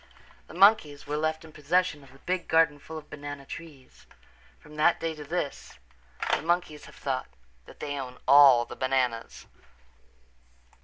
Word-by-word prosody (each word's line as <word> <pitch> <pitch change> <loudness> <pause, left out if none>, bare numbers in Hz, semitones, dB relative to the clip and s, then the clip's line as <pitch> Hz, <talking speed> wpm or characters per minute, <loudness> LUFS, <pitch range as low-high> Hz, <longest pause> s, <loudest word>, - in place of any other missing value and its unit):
The - - -12
monkeys 185 -7 +4
were 145 - -3
left 155 +1 -2
in 160 - -13
possession 160 +1 0
of 135 - -17
the 135 - -17
big 180 +5 -3
garden 160 -2 +3
full 160 +3 -9
of 155 - -12
banana 145 -1 -8
trees. 145 -4 -12 0.5
From 150 - -16
that 155 +3 +3
day 165 -1 -2
to 150 -1 -9
this 145 -2 -5 0.6
the - - -4
monkeys 165 -2 -1
have - - -15
thought 130 -2 -3 0.4
that - - -15
they 145 -1 -4
own 125 -1 -7
all 135 -3 +7
the - - -10
bananas. 130 -3 -2
150 Hz, 160 wpm, -27 LUFS, 140-165 Hz, 0.6 s, all